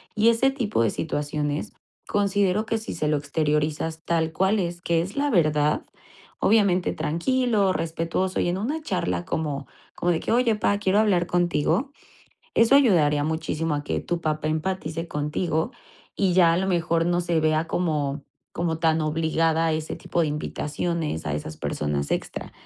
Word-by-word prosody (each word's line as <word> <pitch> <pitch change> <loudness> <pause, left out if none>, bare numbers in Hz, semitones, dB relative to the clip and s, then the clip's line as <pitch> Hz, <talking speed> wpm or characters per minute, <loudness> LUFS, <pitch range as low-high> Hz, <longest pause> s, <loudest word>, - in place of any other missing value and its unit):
y 215 +2 +5
ese 235 +4 +3
tipo 230 - -1
de 115 - +2
situaciones. 145 0 -2 0.4
Considero, 200 0 +1
que 225 - -1
si 220 - -6
se 155 -2 -1
lo 150 - +2
exteriorizas, 150 +2 -1
tal 165 -1 +1
cual 190 +5 +2
es, 175 -1 -3
que 170 -2 +1
es 185 +4 -6
la 290 +1 +1
verdad. 150 - +2 0.5
Obviamente, 200 -4 +3
tranquilo, 205 - +1
respetuoso 165 +3 -2
y - - +1
en 180 - -1
una 295 +9 -2
charla, 90 - -2
como 145 -3 -3 0.3
como 175 - 0
de 165 - +1
que, - - -2
oye, 235 -2 +3
pá, 205 -1 +1
quiero 200 0 +2
hablar 190 -5 +3
contigo. 175 - +1 0.6
Eso 230 +4 +5
ayudaría 160 - +4
muchísimo, 160 0 -1
a 145 - -4
que - - -1
tu 175 -1 -3
papá 155 -1 -1
empatice 165 0 -2
contigo, 155 - -1 0.5
y 190 -3 +2
ya, 170 -3 +6
a 170 - +1
lo 190 - 0
mejor, 170 -1 +1
no 175 0 +2
se 170 -2 +1
vea 155 +1 +1
como 150 -5 -1 0.3
como 165 -2 -1
tan 160 -1 +2
obligada 160 +1 +1
a 160 - +1
ese 155 0 -3
tipo 170 - -2
de - - +1
invitaciones, 150 - -3
a 75 - -1
esas 75 +1 -5
personas 75 -1 -2
extra. - - -3
165 Hz, 170 wpm, -25 LUFS, 155-190 Hz, 0.6 s, ya